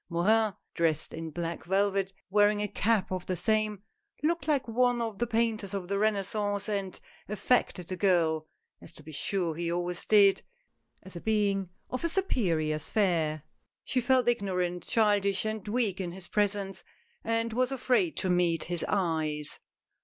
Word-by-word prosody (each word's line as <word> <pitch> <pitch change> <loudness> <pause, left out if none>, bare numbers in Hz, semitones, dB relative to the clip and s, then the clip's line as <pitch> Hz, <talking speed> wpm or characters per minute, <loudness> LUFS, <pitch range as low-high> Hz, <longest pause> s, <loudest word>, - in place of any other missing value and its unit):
Morin, 210 +4 +2 0.2
dressed 160 -2 0
in 165 0 -5
black 170 +1 -4
velvet, 195 +1 +1 0.2
wearing 205 +1 +4
a 210 - 0
cap 210 0 +1
of 185 -1 -3
the 185 - -1
same, 215 0 +1 0.4
looked 335 +2 0
like 290 -5 +1
one 245 +1 +2
of 225 -4 -3
the 240 - 0
painters 225 -4 0
of 185 -2 -4
the 200 0 0
Renaissance, 205 -1 0
and 200 -3 -3 0.3
affected 210 -4 +1
the 185 - -3
girl 165 -5 +2 0.2
— - - -52
as - - -13
to 155 - -13
be 155 - -10
sure 170 +3 -1
he 170 +1 -2
always 175 0 -2
did 200 -2 +6 0.3
— - - -38
as 190 -1 -12
a 170 - -6
being 200 -4 +1 0.2
of 255 - -3
a 335 - +1
superior 170 - 0
sphere. 160 -4 0 0.4
She 255 - 0
felt 255 0 +3
ignorant, 180 -6 0
childish 205 -2 +2
and 215 -2 -3
weak 210 -4 0
in 175 -2 -4
his 185 -1 -9
presence, 200 -2 -1 0.4
and 230 0 0
was 255 +2 +1
afraid 270 +5 +1
to 185 - 0
meet 175 -2 +2
his 175 -1 -3
eyes. 160 -6 -1
200 Hz, 170 wpm, -29 LUFS, 175-220 Hz, 0.4 s, did